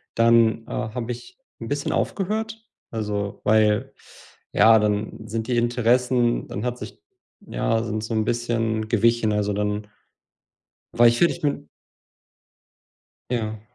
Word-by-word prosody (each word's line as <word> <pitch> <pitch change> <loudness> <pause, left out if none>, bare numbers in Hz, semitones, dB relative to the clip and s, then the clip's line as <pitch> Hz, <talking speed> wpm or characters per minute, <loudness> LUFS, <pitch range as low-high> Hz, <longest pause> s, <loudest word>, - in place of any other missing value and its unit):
Dann, 115 -1 +4
äh, - - -10
habe 120 -1 -3
ich 375 - -13 0.2
'n - - -5
bisschen - - -2
aufgehört, 220 +3 -2 0.2
also 105 -2 -3
weil 110 +4 +3 0.6
ja, 110 0 +6
dann 105 +1 -2
sind 110 0 -3
die 125 - 0
Interessen 120 +1 +2
dann 105 +5 -5
hat 125 0 -2
sich - - -9 0.4
ja 115 0 -1
sind 110 -1 -3
so 115 - -4
'n 110 - +1
bisschen 115 -2 -1
gewichen, 115 -1 +2
also 105 -1 0
dann 105 0 -2 1.1
war 120 0 +6
ich, 120 0 +3
fertig 170 - +2
mit 145 - -2 1.6
Ja. 110 -3 -2
115 Hz, 130 wpm, -23 LUFS, 110-120 Hz, 1.6 s, ja